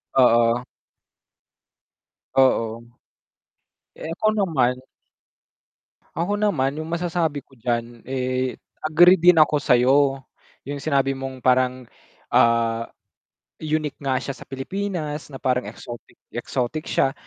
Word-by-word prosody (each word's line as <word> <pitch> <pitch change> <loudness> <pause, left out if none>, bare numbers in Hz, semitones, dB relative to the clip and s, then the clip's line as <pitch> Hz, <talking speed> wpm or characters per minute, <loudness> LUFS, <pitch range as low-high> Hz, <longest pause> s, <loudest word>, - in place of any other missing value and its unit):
Oo. 120 -1 +4 1.7
Oo. 115 -3 +2 1.1
Eh, 160 - -7
ako 215 - -2
naman 155 - +1 1.4
ako 200 +5 -1
naman 145 -9 +1
yung 155 - -7
masasabi 165 -4 -2
ko 135 - -25
diyan, 120 0 -3
eh, 130 -1 -2 0.2
agree 175 +4 +5
din 175 0 +6
ako 155 -1 +5
sayo, 135 +1 +3 0.4
yung 145 0 -5
sinabi 135 -2 +1
mong 135 -1 -7
parang, 130 0 +2 0.5
ah, 115 0 +2 0.7
unique 155 -2 -2
nga 135 -2 0
siya 140 - -4
sa 130 - -17
Pilipinas 155 +1 -4
na 135 - -8
parang 125 -1 -1
exotic 120 0 -11 0.2
exotic 125 +5 -3
siya, 135 - +1
135 Hz, 110 wpm, -23 LUFS, 125-155 Hz, 1.7 s, din